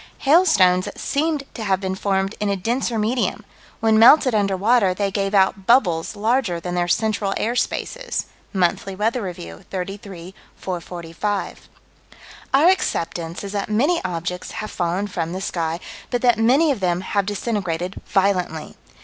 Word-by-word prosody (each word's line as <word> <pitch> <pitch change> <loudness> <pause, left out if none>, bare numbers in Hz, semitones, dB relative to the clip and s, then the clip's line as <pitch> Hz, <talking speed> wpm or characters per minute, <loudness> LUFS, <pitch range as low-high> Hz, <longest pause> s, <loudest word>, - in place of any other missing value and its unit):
Hailstones 205 - +4
that - - -8
seemed 300 0 -1
to 225 - -6
have 190 -3 +1
been 190 -1 -3
formed 195 +1 -1
in 210 - 0
a 200 - +1
denser 235 +4 -1
medium: 225 +4 -1 0.4
when 220 -1 +4
melted 255 +2 +7
under 200 -3 +1
water 205 -2 +3
they 200 0 -1
gave 195 0 -1
out 190 0 +2
bubbles 205 -8 +3
larger 215 -4 0
than 175 +1 -5
their 175 0 0
central 210 +1 0
air 235 +2 -1
spaces. - - -2 0.3
(Monthly 190 0 0
Weather 225 +5 0
Review, 85 - -7
33 190 -1 -6 0.2
445.) 180 +2 -4 0.8
Our 290 +6 +5
acceptance 170 - -1
is 200 - -5
that 200 0 -3
many 280 +11 +1
objects 180 0 -4
have 215 - -5
fallen 175 +3 -1
from 175 -4 -3
the 185 - -3
sky, 165 -3 -2 0.3
but 245 -1 -2
that 240 -3 +4
many 270 +8 +4
of 260 - -2
them 180 -1 0
have 195 +1 -1
disintegrated 190 -4 -3
violently. 185 -5 0
200 Hz, 155 wpm, -21 LUFS, 180-225 Hz, 0.8 s, melted